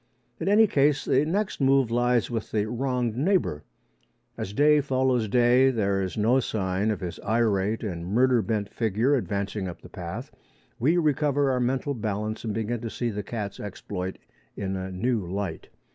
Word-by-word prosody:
In 165 - -3
any 210 +3 +6
case 145 -6 +2
the 135 +3 +3
next 190 +1 -1
move 135 -3 +3
lies 120 0 +2
with 115 -2 -3
the 105 -1 0
wronged 125 -1 -1
neighbour. 145 - +1 0.7
As 95 - -5
day 150 +6 +4
follows 130 -4 +1
day, 125 +4 +4
and 130 - -3
there 100 -2 +1
is 95 +2 -4
no 115 +5 +3
sign 100 -3 -1
of 105 - -2
his 90 -2 -5
irate 110 -1 +1
and 85 -5 -4
murder 125 +4 +3
bent 105 -2 -1
figure 115 +4 +1
advancing 100 -4 -2
up 90 - -8
the - - -11
path, 105 - -7 0.5
we 155 +9 +3
recover 145 -3 +2
our 130 - 0
mental 130 +3 0
balance 110 -2 -3
and 110 - -2
begin 110 +2 -2
to 115 - -4
see 120 +1 -2
the 105 0 -3
cat's 105 -1 -5
exploit 95 -2 -5 0.4
in 95 -1 -2
a 95 0 -4
new 115 +6 0
light. 95 -5 -4
115 Hz, 175 wpm, -26 LUFS, 100-130 Hz, 0.7 s, any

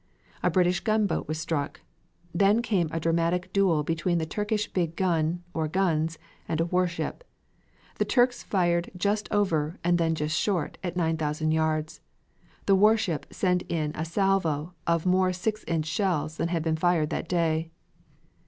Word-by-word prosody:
A - - +2
British 180 -1 +2
gunboat 215 +2 0
was 155 +1 -2
struck. 160 -3 -3 0.5
Then 200 +6 +3
came 185 -9 +1
a 165 - -2
dramatic 170 +3 0
duel 185 -6 +3
between 165 +3 0
the 160 - -1
Turkish 210 +5 -1
big 170 -3 -1
gun, 170 -1 0
or 160 -1 -1
guns, 165 -2 0 0.3
and 160 - -1
a 165 - +2
warship. 180 - -1 0.8
The - - +2
Turks 245 0 +2
fired 175 -3 +1
just 205 +3 -1
over, 170 -6 +1
and 175 0 +2
then 165 -1 +2
just 150 0 -1
short, 180 -5 -1
at 175 -1 -3
9,000 155 -2 0
yards. 155 -1 -1 0.6
The 200 - +4
warship 205 -5 +2
sent 180 -2 +1
in 155 -3 -1
a 160 - -3
salvo 170 -3 0
of 170 0 +1
more 185 0 +3
six 215 +4 -2
inch 160 -2 0
shells 160 -2 -1
than - - 0
had 170 -2 -1
been 160 -1 0
fired 165 -2 +2
that 165 - -3
day. 165 -2 +1
170 Hz, 160 wpm, -27 LUFS, 160-185 Hz, 0.8 s, The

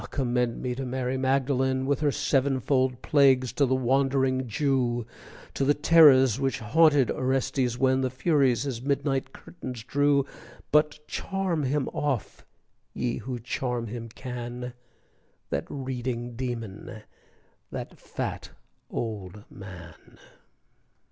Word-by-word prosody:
commend 125 -3 0
me 125 -1 -1
to 135 +2 -4
Mary 130 0 -2
Magdalen 130 0 +1
With 140 0 +1
her 150 -2 +2
sevenfold 130 -2 +1
plagues, 130 -4 +4
to 140 +2 +2
the 130 - +2
wandering 130 0 +1
Jew, 120 -1 0 0.5
To - - -1
the 145 +2 +3
terrors 145 -6 +6
which 135 0 0
haunted 145 +3 +4
Orestes 130 -1 0
when 130 0 +3
The 130 - 0
furies 130 -1 +2
his 130 -5 -4
midnight 135 -1 -1
curtains 125 -9 -9
drew, 140 +1 +2 0.5
But 150 0 +2
charm 190 -5 -2
him 135 +1 0
off, 140 -7 -3 0.5
ye 120 -1 -1
who 125 -1 -5
charm 120 0 -3
him 115 +1 -6
can, 125 0 -6 0.8
That - - -2
reading 125 -3 -4
demon, 115 -4 -5 0.7
that - - -7
fat - - -5 0.4
old 105 -3 -5
man! 90 -4 -12
130 Hz, 120 wpm, -27 LUFS, 120-140 Hz, 0.8 s, terrors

